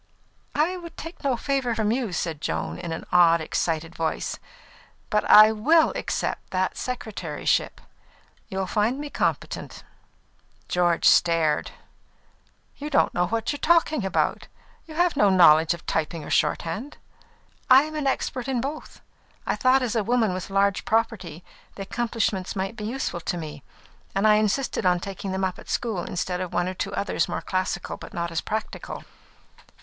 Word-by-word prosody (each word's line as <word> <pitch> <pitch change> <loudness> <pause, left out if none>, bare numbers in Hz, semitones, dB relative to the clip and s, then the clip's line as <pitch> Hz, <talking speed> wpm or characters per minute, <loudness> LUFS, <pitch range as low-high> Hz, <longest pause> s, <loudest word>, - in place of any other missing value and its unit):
"I 330 +5 +1
would 335 -2 -10
take 330 +2 -9
no 265 -3 +1
favour 265 -3 -1
from 215 -1 +1
you," 240 -4 -1
said 165 -4 -3
Joan, 80 - -3
in 170 - -5
an 160 - -5
odd, 170 -2 +6
excited 165 +1 -2
voice. 160 -1 -2 0.7
"But 210 - +2
I 215 +1 +9
will 310 +10 +4
accept - - -3
that 185 0 -1
secretaryship; 210 -11 -2 0.7
you'll 190 0 -2
find 215 +7 0
me 290 0 -6
competent." - - -3 0.8
George 175 -1 +1
stared. 165 -3 +3 1.1
"You 295 +1 -5
don't 280 - +2
know 180 0 +1
what 225 +3 -1
you - - -4
are - - -27
talking 320 -5 +3
about. 190 - 0 0.4
You 310 - -10
have 350 0 +2
no 205 -6 +4
knowledge 165 -3 +6
of 170 - -16
typing 160 0 -2
or - - -8
shorthand." 205 - -1 0.7
"I 265 +2 +8
am 305 -2 -3
expert 260 -1 -2
in 260 -2 0
both. 285 +5 -6 0.4
I - - 0
thought, 260 +1 +3
as 240 -2 -2
a 220 - +2
woman 230 -3 +1
with 185 +1 -5
large 195 0 +1
property, 200 -7 -1 0.3
the 195 - -5
accomplishments 220 -3 -2
might 195 +3 -3
be 210 - -6
useful 230 -6 -3
to 175 - -3
me, 150 -3 -7 0.5
and 195 +2 +3
I 210 0 +6
insisted 215 +4 0
on 180 -1 +3
taking 195 +1 -6
them 190 0 -2
up 185 -1 -2
at - - -13
school 220 -7 -1
instead 180 0 -3
of 185 - -4
one 175 +1 +1
or 185 - -3
two 195 +2 -4
others 200 - -1
more - - -3
classical 185 -1 -2
but - - -11
not 170 0 -2
as 165 - -1
practical." 220 0 -5
200 Hz, 165 wpm, -25 LUFS, 175-250 Hz, 1.1 s, I